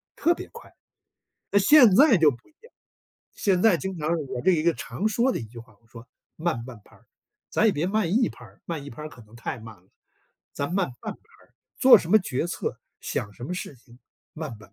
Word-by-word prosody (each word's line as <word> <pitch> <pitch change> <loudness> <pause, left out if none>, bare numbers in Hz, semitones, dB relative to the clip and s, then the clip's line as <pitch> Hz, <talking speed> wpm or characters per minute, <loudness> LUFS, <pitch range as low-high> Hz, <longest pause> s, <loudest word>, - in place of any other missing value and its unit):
特 340 - +2
别 - - -9
快。 - - -13 0.8
那 200 - +4
现 240 0 +7
在 275 -4 +6
就 160 -2 +5
不 120 -3 -13
一 - - -28
样， 465 - -18 0.6
现 185 -3 0
在 220 -6 +5
经 185 +3 -5
常， 155 0 -2 0.2
我 130 -1 -4
这 - - +4
一 160 -3 +1
个 170 0 +2
常 215 - -3
说 240 +4 +1
的 - - -2
一 - - -6
句 115 +2 -12
话， 115 -1 -18
我 115 - -30
说： 115 +1 -13 0.3
“慢 160 -8 -2
半 120 -3 -11
拍 - - -21
儿。” - - -27 0.4
咱 225 - +2
也 215 - +4
别 155 +2 -1
慢 195 -3 0
一 235 +3 +3
拍 - - -13
儿， - - -18
慢 160 -4 -5
一 145 - -9
拍 120 - -10
儿 155 - -6
可 125 -5 -15
能 110 +2 -17
太 120 - -5
慢 110 -1 -12
了， 90 +1 -29 0.6
咱 145 +5 -4
慢 190 -7 0
半 - - -5
拍 - - -23 0.3
儿。 - - -38 0.2
做 260 -1 +9
什 170 - -7
么 215 - +7
决 165 -6 -3
策， - - -4 0.2
想 100 - -4
什 120 - -9
么 180 - -4
事 175 - -6
情 120 0 -20 0.4
慢 155 -7 -6
拍 105 - -15
儿。 - - -31
160 Hz, 260 characters per minute, -25 LUFS, 120-200 Hz, 0.8 s, 做